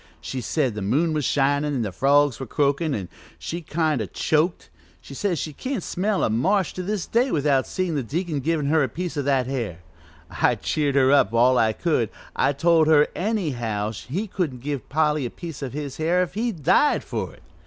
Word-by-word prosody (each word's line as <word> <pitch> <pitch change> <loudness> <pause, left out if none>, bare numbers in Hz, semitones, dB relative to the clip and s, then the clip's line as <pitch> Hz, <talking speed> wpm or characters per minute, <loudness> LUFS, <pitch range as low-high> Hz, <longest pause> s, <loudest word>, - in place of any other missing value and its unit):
She 130 - -5
said 130 +1 0
the 105 - -5
moon 150 - +1
was 150 -3 -1
shinin' 145 +1 +1
an' 125 - 0
the 105 - -3
frogs 140 +5 +3
were 135 - -5
croakin', 145 +3 +1
an' 95 -4 -4 0.3
she 170 +1 -5
kind 155 -4 0
o' 105 - -3
choked; 155 - 0 0.3
she - - -12
says 180 +4 -1
she 155 +1 -4
can't 255 - -4
smell 200 +2 -1
a - - +2
marsh 185 - +1
to 185 - -5
this 200 0 -2
day 245 +4 +1
without 140 - +1
seein' 185 -3 -2
the 145 - 0
deacon 155 +4 -2
givin' 155 +1 0
her 155 +3 +3
that 130 -4 -2
piece 180 0 -3
of 145 -2 -2
hair. 125 - -1 0.5
I 120 +7 +2
cheered 145 +5 -1
her 135 -1 +4
up 130 -7 +4
all 125 +2 +5
I 110 -1 +3
could 125 - 0 0.3
I - - +2
told 160 +2 +3
her 150 -2 +5
anyhow 125 - -1
he 125 - -4
couldn't 165 - -3
give 140 -1 -4
Polly 150 -1 +1
a 120 - -2
piece 165 +2 -8
of 135 -3 -5
his 145 -2 -5
hair 170 +3 +2
if 180 -1 -6
he 230 +4 -1
died 190 - +2
for - - -4
it. - - -22
145 Hz, 205 wpm, -24 LUFS, 130-170 Hz, 0.5 s, all